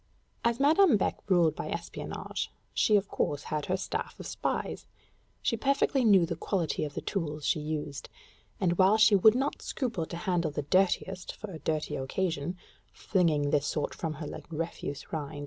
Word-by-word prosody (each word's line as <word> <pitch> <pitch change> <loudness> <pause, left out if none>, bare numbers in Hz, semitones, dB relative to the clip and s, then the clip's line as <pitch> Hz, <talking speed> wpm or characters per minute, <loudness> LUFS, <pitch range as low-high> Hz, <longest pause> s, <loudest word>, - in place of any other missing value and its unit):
As 235 +1 +1
Madame 305 - +5
Beck - - -1
ruled 170 -4 +4
by - - -5
espionage, - - -4 0.2
she 215 - +3
of 200 -1 +2
course 145 -6 -1
had 150 -1 -3
her 185 - +1
staff - - -4
of - - -7
spies; - - -3 0.6
she - - +2
perfectly 275 +2 +2
knew 195 -6 +6
the 170 0 -3
quality 170 -3 -1
of 145 -1 -5
the - - -3
tools 150 -6 -3
she - - +2
used, 150 -2 -4 0.5
and 175 -2 +1
while 195 +3 +6
she 215 -1 +6
would 215 +4 +6
not 270 +3 -1
scruple 225 - -2
to 170 - -6
handle 175 -2 0
the 145 0 -3
dirtiest 185 +3 +1
for 210 -1 -8
a 160 - -7
dirty 155 +1 -2
occasion 160 +4 -2 0.3
flinging 155 -7 +1
this 145 -1 +2
sort 150 - -1
from 160 -2 -4
her 150 +1 -6
like - - -8
refuse 165 -3 -5
rind? 150 -1 -4
175 Hz, 180 wpm, -29 LUFS, 150-205 Hz, 0.6 s, knew